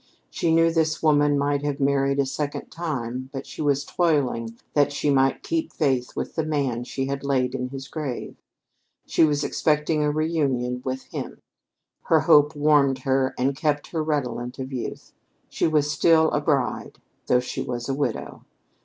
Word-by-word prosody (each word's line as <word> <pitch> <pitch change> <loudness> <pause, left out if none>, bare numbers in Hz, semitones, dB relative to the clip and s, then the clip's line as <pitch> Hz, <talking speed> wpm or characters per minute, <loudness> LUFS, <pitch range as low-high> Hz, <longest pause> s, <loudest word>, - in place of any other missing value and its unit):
She 165 - 0
knew 165 0 +4
this 160 -1 0
woman 145 -2 +4
might 140 0 0
have 145 -1 -2
married 140 0 +2
a 140 - +2
second 145 +2 -4
time; 130 -6 -4
but 135 -1 -6
she - - -8
was 145 -1 +1
toiling 130 -9 0 0.2
that 145 -1 +3
she 145 0 0
might 135 -1 +2
keep 325 -1 -2
faith 130 -5 0
with - - -4
the 160 - -1
man 140 -6 -1
she 135 +1 -3
had 140 +1 -3
laid 130 -2 0
in 125 -1 -2
his 135 0 -7
grave. 150 -6 -5 0.7
She - - +2
was 145 -2 +2
expecting 150 0 +1
a 150 - +2
reunion 140 -6 0
with 130 0 -3
him. - - -7 0.7
Her - - +4
hope 150 +1 +5
warmed 145 -2 +3
her 130 0 +1
and 135 +2 +1
kept 145 0 -1
her 160 - -1
redolent 125 -5 -2
of 130 0 -6
youth. 125 - -6 0.4
She - - 0
was 150 -2 +2
still 160 +1 +4
a 145 - 0
bride, 145 -3 -1 0.3
though 125 - +4
she 125 - -4
was 120 -1 -4
a 135 - -1
widow. 140 +1 -3
140 Hz, 175 wpm, -24 LUFS, 130-150 Hz, 0.7 s, hope